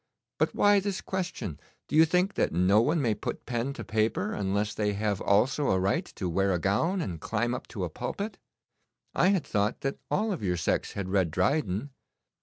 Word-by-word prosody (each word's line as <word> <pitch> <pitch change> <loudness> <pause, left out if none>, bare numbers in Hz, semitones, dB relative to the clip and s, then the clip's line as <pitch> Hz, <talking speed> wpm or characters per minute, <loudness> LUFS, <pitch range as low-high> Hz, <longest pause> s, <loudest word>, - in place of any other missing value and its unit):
But - - +1
why 205 0 +5
this 195 -1 -2
question? 180 - -4 0.3
Do - - -3
you 160 +1 +8
think 180 +4 +1
that - - +1
no 90 +5 +4
one 150 +5 +1
may 115 -3 +2
put 105 - -5
pen 120 +2 -2
to - - -7
paper 110 -2 0
unless 100 +1 -1
they 105 -1 0
have 100 -1 -1
also 125 +8 +2
a 95 - +3
right 95 +2 +1
to 95 - -3
wear 95 +3 +1
a - - +1
gown 110 - +1
and 85 - -4
climb 120 +1 -1
up - - -5
to 100 - -5
a 90 - -2
pulpit? 200 - -4 0.7
I - - +3
had 190 -5 +2
thought 105 +2 0
that 135 0 -2
all 215 +2 +1
of 185 - -3
your 90 -3 0
sex 85 - -1
had 100 -2 -4
read 95 -3 +2
Dryden. 105 - 0
105 Hz, 205 wpm, -28 LUFS, 95-155 Hz, 0.7 s, you